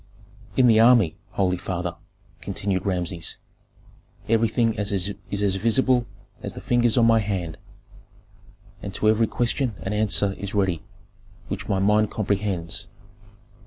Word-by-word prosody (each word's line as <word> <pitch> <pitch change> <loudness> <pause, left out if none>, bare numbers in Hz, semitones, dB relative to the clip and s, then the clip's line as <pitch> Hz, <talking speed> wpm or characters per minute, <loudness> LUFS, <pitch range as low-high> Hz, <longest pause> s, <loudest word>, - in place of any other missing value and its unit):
"In 130 - +5
the 115 -2 +6
army, 115 -8 +5 0.2
holy 90 -2 +1
father," 90 -1 -4 0.5
continued 95 -1 -2
Rameses, 90 -2 -2 0.9
"everything 115 +1 +2
is 105 -1 -1
as 90 - +1 0.5
visible 120 +3 +2 0.3
as - - -5
the - - -8
fingers 120 -1 +2
on 120 - +5
my 115 -1 +5
hand, 95 -6 -3 1.2
and 100 -1 -6
to 110 - 0
every 110 +1 +3
question 120 0 -1
an 95 - -3
answer 105 -2 +2
is 100 +1 -5
ready 95 -5 +1 0.7
which - - -5
my 100 - +1
mind 105 +2 +3
comprehends. 100 -5 -2
105 Hz, 125 wpm, -24 LUFS, 95-115 Hz, 1.2 s, the